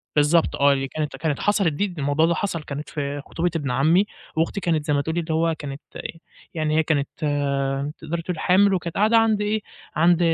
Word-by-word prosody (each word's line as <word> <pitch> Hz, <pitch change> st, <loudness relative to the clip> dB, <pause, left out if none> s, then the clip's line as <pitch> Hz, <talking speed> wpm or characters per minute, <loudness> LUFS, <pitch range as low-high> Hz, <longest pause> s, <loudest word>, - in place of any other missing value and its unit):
بالضبط 150 Hz, +3 st, +3 dB
آه، 140 Hz, 0 st, +4 dB
دي 135 Hz, 0 st, -1 dB
كانت 150 Hz, -1 st, -4 dB
كانت 150 Hz, 0 st, -2 dB
حَصَلِت 200 Hz, -6 st, +2 dB
دي 200 Hz, +8 st, 0 dB
د 175 Hz, -4 st, -9 dB
الموضوع 145 Hz, +3 st, +2 dB
ده 170 Hz, -, +2 dB
حَصَل 170 Hz, -5 st, -2 dB
كانت 145 Hz, +1 st, -6 dB
في 145 Hz, -1 st, -3 dB
خطوبة 170 Hz, +1 st, -1 dB
إبن 140 Hz, -5 st, -1 dB
عمي، 160 Hz, +10 st, +3 dB, 0.3 s
وأختي 165 Hz, +5 st, 0 dB
كانت 160 Hz, -5 st, 0 dB
زي 150 Hz, -, +1 dB
ما 145 Hz, -, +2 dB
تقولي 160 Hz, +4 st, -2 dB
اللي 160 Hz, -1 st, -2 dB
هو 165 Hz, 0 st, +1 dB
كانت 140 Hz, 0 st, -6 dB
أ -, -, -6 dB, 0.5 s
يعني 155 Hz, -1 st, 0 dB
هي 160 Hz, -, +4 dB
كانت 145 Hz, -3 st, +1 dB, 0.9 s
تقدري 165 Hz, +1 st, -4 dB
تقولي 170 Hz, -1 st, -4 dB
حامل، 195 Hz, +3 st, +4 dB
وكانت 175 Hz, -2 st, -2 dB
قاعدة 220 Hz, +3 st, +4 dB
عند 220 Hz, -2 st, +3 dB
إيه، 210 Hz, +1 st, 0 dB, 0.3 s
عند 170 Hz, +2 st, +4 dB
160 Hz, 210 wpm, -23 LUFS, 145-175 Hz, 0.9 s, آه